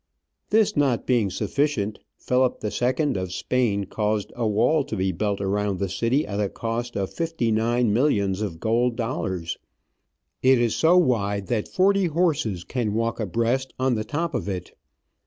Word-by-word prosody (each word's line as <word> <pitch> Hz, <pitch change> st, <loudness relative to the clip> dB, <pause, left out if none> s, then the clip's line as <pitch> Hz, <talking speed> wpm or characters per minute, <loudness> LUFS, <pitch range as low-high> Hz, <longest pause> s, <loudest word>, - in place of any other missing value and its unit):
This 220 Hz, -1 st, +3 dB
not 135 Hz, -5 st, +1 dB
being 120 Hz, -6 st, +2 dB
sufficient, 110 Hz, +1 st, -1 dB, 0.2 s
Philip 125 Hz, 0 st, +1 dB
II. 130 Hz, +7 st, 0 dB
of 95 Hz, -1 st, -3 dB
Spain 105 Hz, -1 st, 0 dB
caused 105 Hz, +1 st, -2 dB
a 120 Hz, -2 st, 0 dB
wall 115 Hz, +9 st, +2 dB
to 130 Hz, -, -4 dB
be 95 Hz, -1 st, 0 dB
built 100 Hz, +3 st, -1 dB
around 100 Hz, 0 st, -1 dB
the 100 Hz, 0 st, -2 dB
city 115 Hz, -, +1 dB
at 100 Hz, 0 st, -4 dB
a 100 Hz, -2 st, 0 dB
cost 115 Hz, +2 st, -4 dB
of 95 Hz, -1 st, -2 dB
fifty 165 Hz, -9 st, -1 dB
nine 115 Hz, 0 st, +2 dB
millions 105 Hz, -6 st, +1 dB
of 90 Hz, -6 st, -4 dB
gold 115 Hz, +3 st, +1 dB
dollars. 95 Hz, -8 st, -3 dB, 0.8 s
It 130 Hz, 0 st, +5 dB
is 120 Hz, -2 st, +1 dB
so 170 Hz, +3 st, +4 dB
wide 100 Hz, -, +1 dB
that 115 Hz, -4 st, 0 dB
forty 195 Hz, 0 st, +3 dB
horses 155 Hz, -, 0 dB
can 110 Hz, -3 st, -2 dB
walk 115 Hz, +1 st, -1 dB
abreast 115 Hz, +6 st, -1 dB
on 130 Hz, 0 st, +1 dB
the 110 Hz, -2 st, -1 dB
top 160 Hz, +8 st, -2 dB
of -, -, -2 dB
it. 90 Hz, -2 st, -5 dB
115 Hz, 165 wpm, -24 LUFS, 100-130 Hz, 0.8 s, It